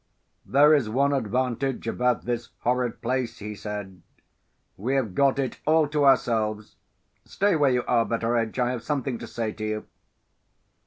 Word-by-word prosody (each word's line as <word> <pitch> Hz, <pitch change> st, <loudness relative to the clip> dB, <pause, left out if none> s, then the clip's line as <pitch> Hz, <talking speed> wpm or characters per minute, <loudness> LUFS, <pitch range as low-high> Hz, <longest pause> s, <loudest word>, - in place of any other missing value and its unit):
"There 145 Hz, +3 st, +6 dB
is 135 Hz, -8 st, +2 dB
one 140 Hz, +5 st, +2 dB
advantage 125 Hz, +1 st, -1 dB
about 125 Hz, +1 st, 0 dB
this 120 Hz, -1 st, -3 dB
horrid 125 Hz, -1 st, -1 dB
place," 120 Hz, -1 st, -1 dB
he 105 Hz, +1 st, -6 dB
said; 100 Hz, -3 st, -7 dB, 0.7 s
"we 125 Hz, +8 st, -2 dB
have 120 Hz, -8 st, 0 dB
got 135 Hz, +5 st, +3 dB
it 130 Hz, -3 st, -2 dB
all 155 Hz, -1 st, +4 dB
to 150 Hz, -1 st, +1 dB
ourselves. 110 Hz, -5 st, +1 dB, 0.5 s
Stay 200 Hz, -2 st, +1 dB
where 145 Hz, -3 st, +3 dB
you 125 Hz, -1 st, +1 dB
are, 120 Hz, -2 st, +3 dB
Betteredge; 115 Hz, 0 st, -1 dB
I 125 Hz, -1 st, +1 dB
have 125 Hz, -2 st, -4 dB
something 135 Hz, -1 st, -2 dB
to -, -, -7 dB
say 115 Hz, -2 st, -3 dB
to 110 Hz, -, -8 dB
you." 110 Hz, 0 st, -3 dB
125 Hz, 160 wpm, -25 LUFS, 110-135 Hz, 0.7 s, There